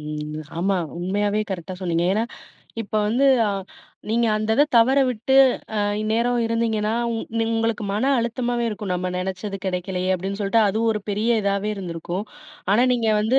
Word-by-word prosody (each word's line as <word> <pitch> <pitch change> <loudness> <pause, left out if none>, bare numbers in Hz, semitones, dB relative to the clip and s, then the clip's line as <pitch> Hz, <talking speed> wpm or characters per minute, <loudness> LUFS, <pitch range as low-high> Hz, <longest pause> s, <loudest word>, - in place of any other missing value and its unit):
ம். 150 0 -5 0.2
ஆமா, 195 +2 +1 0.2
உண்மையாவே 205 +3 0
கரெக்ட்டா 185 0 -6
சொன்னனீங்க. 170 -1 0
ஏன்னா 220 +2 +1 0.6
இப்போ 215 +1 -2
வந்து 255 +5 +3 0.2
ஆ - - +1 0.6
நீங்க, 235 +1 +2
அந்த 215 +1 -2
இத 290 - +6
தவற 260 +4 +5
விட்டு 250 +3 -1 0.4
அ - - +2 0.2
இந்நேரம் 230 +3 +1
இருந்தீங்கன்னா, 225 -2 0 0.2
உங் 225 0 -2
உங்களுக்கு 225 -1 0
மன 210 +5 0
அழுத்தமாவே 240 +1 -1
இருக்கும், 210 -2 -5
நம்ம 180 0 -1
நினைச்சது 190 +2 -3
கிடைக்கலயே 185 0 -2
அப்பிடின்னு. 195 +2 -4
சொல்லிட்டு, 205 +3 +2
அது 210 - -1
ஒரு 215 - 0
பெரிய 220 +3 +1
இதாவே 200 +1 0
இருந்திருக்கும். 180 +1 -4 0.5
ஆனா, 235 +4 +4
நீங்க 230 -3 +1
வந்து 230 +5 +3
210 Hz, 155 wpm, -23 LUFS, 185-230 Hz, 0.6 s, இத